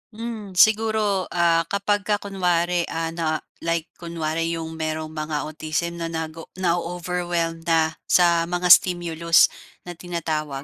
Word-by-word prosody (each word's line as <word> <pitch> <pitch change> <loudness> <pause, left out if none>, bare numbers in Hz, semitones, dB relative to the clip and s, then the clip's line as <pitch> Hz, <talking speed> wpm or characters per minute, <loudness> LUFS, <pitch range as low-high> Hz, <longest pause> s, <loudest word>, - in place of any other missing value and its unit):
Hmm, 220 -4 -6
siguro 215 -1 +3
ah, 165 -1 +3
kapag 200 +1 -1
ka 210 - +3
kunwari 180 -3 0
ah, 165 0 -3
na 160 -2 -2 0.2
like 165 0 -2
kunwari 165 -1 -2
'yong 160 -1 -5
mayroong 155 0 -3
mga 155 -2 -3
autism 155 +2 -3
'no, 165 - -2
nag 160 -1 -4 0.2
na-o-overwhelmed 175 -1 -2
na 160 -1 +3 0.2
sa 170 -2 +4
mga 180 0 +1
stimulus 170 -2 +5 0.3
na 175 -2 -9
tinatawag. 155 -5 -3
170 Hz, 130 wpm, -23 LUFS, 160-180 Hz, 0.3 s, stimulus